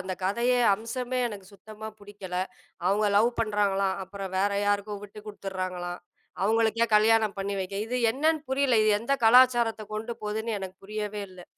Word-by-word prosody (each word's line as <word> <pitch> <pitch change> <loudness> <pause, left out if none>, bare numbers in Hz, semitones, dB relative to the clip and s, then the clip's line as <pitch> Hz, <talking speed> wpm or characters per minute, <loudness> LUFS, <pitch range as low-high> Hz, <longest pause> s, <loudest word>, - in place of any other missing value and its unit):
அந்த 185 0 -4
கதையே 235 +6 +2 0.2
அம்சமே 245 +4 -4
எனக்கு 200 -3 -9
சுத்தமா 215 +2 -10
புடிக்கல. 200 -3 -8 0.5
அவங்க 205 +3 +2
லவ் 225 +3 +5
பண்றாங்களாம், 200 -3 +1
அப்புறம் 195 -1 -7
வேற 200 +2 +2
யாருக்கும் 205 0 -1
விட்டுக்குடுத்துறாங்களாம், 190 -4 -6 0.4
அவங்களுக்கே 225 +2 +2
கல்யாணம் 220 -1 +3
பண்ணி 195 0 -2
வைக்க, 190 +1 -5
இது 250 +2 -2
என்னன்னு 310 +2 +1
புரியல, 265 -4 +3
இது 215 - +4
எந்த 240 +5 +1
கலாச்சாரத்தைக் 235 -3 +4
கொண்டு 225 +2 -4
போதுன்னு 220 +1 -2
எனக்கு 190 -1 -7
புரியவே 210 0 -4
இல்ல. 180 -1 -12
210 Hz, 145 wpm, -27 LUFS, 195-230 Hz, 0.5 s, லவ்